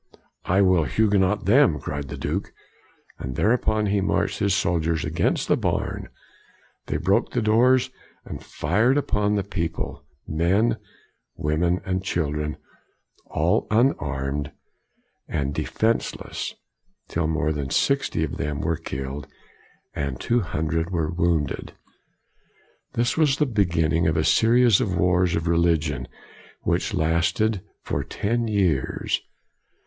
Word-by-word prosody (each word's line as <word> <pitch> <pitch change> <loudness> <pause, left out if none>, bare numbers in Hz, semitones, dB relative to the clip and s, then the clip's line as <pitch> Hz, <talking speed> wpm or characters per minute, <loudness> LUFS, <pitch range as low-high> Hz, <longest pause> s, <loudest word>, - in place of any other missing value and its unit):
" - - -43
I 100 - +5
will 90 -4 +4
Huguenot 100 - +2
them," 115 - +4
cried 70 0 -5
the - - -6
Duke. - - -3 0.7
And 65 -1 -5
thereupon 110 - +2
he 100 0 +1
marched - - 0
his 100 -2 +2
soldiers 85 -3 0
against 80 +2 0
the - - +4
barn; - - -2 0.8
they - - -1
broke - - +1
the - - +1
doors, 125 +4 +4 0.3
and - - -7
fired 110 - +1
upon 105 -7 +1
the 100 - 0
people, 85 -7 -4 0.2
men, 95 +9 +2 0.6
women, 85 +4 0
and 95 -1 -1
children, 75 -4 -2 0.7
all - - +1
unarmed 75 - 0 0.8
and 70 -1 -2
de - - -2
fenseless, 115 +1 -2 0.5
till 80 -1 -1
more 80 -1 0
than 70 -3 -3
sixty 140 - +1
of 75 - -3
them 75 0 -2
were 80 -1 0
killed, 70 -2 -5 0.7
and 70 -3 -3
two 120 0 +1
hundred 80 -3 -1
were 80 -4 -1
wounded. 85 -4 -1 1.2
This 120 +4 0
was 150 -3 +3
the 150 - +3
beginning 85 - +1
of 80 - +1
a - - +2
series 115 -2 +4
of 95 -4 -1
wars 90 0 +2
of 80 +1 -2
religion 85 -3 +1 0.6
which - - 0
lasted 85 +6 +1 0.2
for - - -2
ten 115 +3 -1
years. 95 -11 0
85 Hz, 130 wpm, -24 LUFS, 75-105 Hz, 1.2 s, I